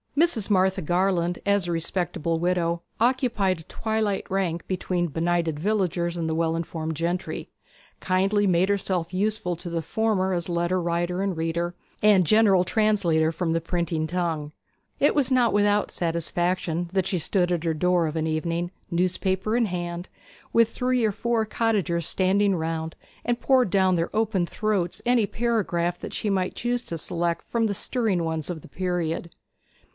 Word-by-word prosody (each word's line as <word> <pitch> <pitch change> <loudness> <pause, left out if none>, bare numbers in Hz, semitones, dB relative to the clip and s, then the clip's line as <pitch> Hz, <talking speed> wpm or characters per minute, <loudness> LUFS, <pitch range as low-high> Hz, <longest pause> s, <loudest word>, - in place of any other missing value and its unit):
Mrs. 295 - +2
Martha 190 -1 +2
Garland, 175 +1 +1
as 200 -3 +2
a - - -1
respectable 165 -1 -1
widow, 170 -1 0 0.2
occupied 230 -7 +1
a - - -11
twilight 220 +1 -2
rank 185 -3 -1
between 180 -1 -1
the 165 - -5
benighted 165 -1 0
villagers 175 -3 0
and 165 -1 -1
the 160 - -1
well 165 0 +1
informed 160 -1 -3
gentry, 170 +4 -2 0.5
and - - -40
kindly 195 +3 +2
made 180 0 +3
herself 185 -3 -1
useful 195 -2 0
to 175 +1 -7
the 170 -1 -2
former 190 +2 0
as 175 -1 -1
letter 175 +1 0
writer 175 +2 -1
and 195 -3 -1
reader, 170 +2 -1 0.3
and 205 -4 +6
general 200 -1 +5
translator 185 -6 +2
from 165 0 -2
the 165 0 +1
printing 165 -2 -1
tongue. 165 -4 -2 0.5
It 290 - +4
was 275 -3 +2
not 250 -2 +3
without 205 0 +2
satisfaction 170 0 -1
that 190 -2 +1
she 190 - 0
stood 180 +2 +1
at 170 -2 0
her 165 -1 +1
door 180 +1 +2
of 155 - -4
an 160 0 0
evening, 170 +2 -1 0.2
newspaper 185 +4 0
in 240 -1 +3
hand, 175 -2 -4 0.4
with 230 -1 +4
three 250 0 0
or 215 - +2
four 230 +2 0
cottagers 200 -7 0
standing 195 +1 +2
round, 160 -1 -3 0.3
and 240 0 0
poured 255 -5 +3
down 190 -1 +3
their 170 0 -1
open 215 -5 +1
throats 200 -5 -1
any 240 -3 +3
paragraph 195 -8 0
that - - -7
she 210 - -2
might 185 -2 0
choose 240 0 -1
to 165 - -5
select 170 +1 -2
from 230 -1 +1
the 200 - -2
stirring 215 -6 0
ones 160 -2 -2
of 170 -3 -4
the - - -13
period. 175 -1 -2
180 Hz, 170 wpm, -25 LUFS, 170-205 Hz, 0.5 s, and